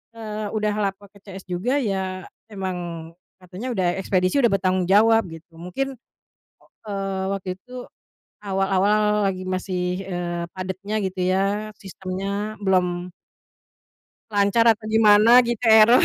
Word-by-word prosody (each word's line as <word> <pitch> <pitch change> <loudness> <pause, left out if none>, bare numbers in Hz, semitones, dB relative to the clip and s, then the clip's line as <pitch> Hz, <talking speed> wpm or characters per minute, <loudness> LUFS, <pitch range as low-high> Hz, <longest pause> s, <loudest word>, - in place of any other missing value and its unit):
eee, 215 -2 -5
udah 210 -1 0 0.2
lapor 195 +1 -14
ke 200 - -18
CS 195 -2 -10
juga 195 +10 -1
ya 190 -7 -2 0.2
emang 190 -3 -4 0.6
katanya 185 +6 -8
udah 185 -3 +1
ekspedisi 185 +8 +1
udah 235 - +4
bertanggung 185 -2 +1
jawab 225 +3 +5
gitu, 165 +1 -12
mungkin, 270 +11 -3 0.9
eee, 195 -1 -3
waktu 190 -2 -3
itu 250 +2 -9 0.5
awal-awal 200 +1 +1
lagi 185 -1 -2
masih, 185 0 -3
eee, 175 -2 -3
padetnya 190 +2 -5
gitu 190 -1 -3
ya 200 +3 0
sistemnya, 195 +3 -5
belum 180 -2 0 1.2
lancar 200 +3 +3
atau 215 0 -12
gimana 220 +2 +7
gitu, 240 -1 -2
eror. 220 +1 +7
195 Hz, 125 wpm, -23 LUFS, 185-215 Hz, 1.2 s, gimana